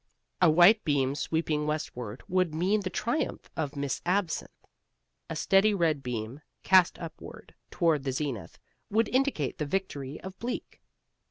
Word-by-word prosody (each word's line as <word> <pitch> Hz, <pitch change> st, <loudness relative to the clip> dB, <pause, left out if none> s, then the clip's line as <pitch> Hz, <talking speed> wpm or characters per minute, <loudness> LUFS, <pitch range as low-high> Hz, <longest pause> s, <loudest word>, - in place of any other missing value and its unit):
A 180 Hz, -, +7 dB
white 175 Hz, +7 st, +6 dB
beam 135 Hz, -3 st, +1 dB
sweeping 150 Hz, +1 st, -1 dB
westward 125 Hz, -7 st, -4 dB
would 185 Hz, -3 st, +1 dB
mean 190 Hz, +6 st, +2 dB
the 190 Hz, -, -3 dB
triumph 235 Hz, +11 st, -2 dB
of 150 Hz, -2 st, -3 dB
Miss 140 Hz, -1 st, -2 dB
Absinthe. 180 Hz, -2 st, 0 dB, 0.8 s
A -, -, -4 dB
steady 200 Hz, +2 st, +3 dB
red 160 Hz, -6 st, +1 dB
beam 125 Hz, +2 st, -5 dB, 0.2 s
cast 185 Hz, -2 st, +5 dB
upward 165 Hz, -2 st, -10 dB, 0.2 s
toward 165 Hz, -4 st, +2 dB
the 135 Hz, -, -1 dB
zenith 135 Hz, -5 st, -4 dB, 0.3 s
would 220 Hz, +2 st, +2 dB
indicate 260 Hz, -, 0 dB
the 150 Hz, -, 0 dB
victory 145 Hz, -6 st, -3 dB
of 190 Hz, 0 st, -9 dB
Bleak. 245 Hz, +2 st, -5 dB
160 Hz, 145 wpm, -29 LUFS, 140-190 Hz, 0.8 s, A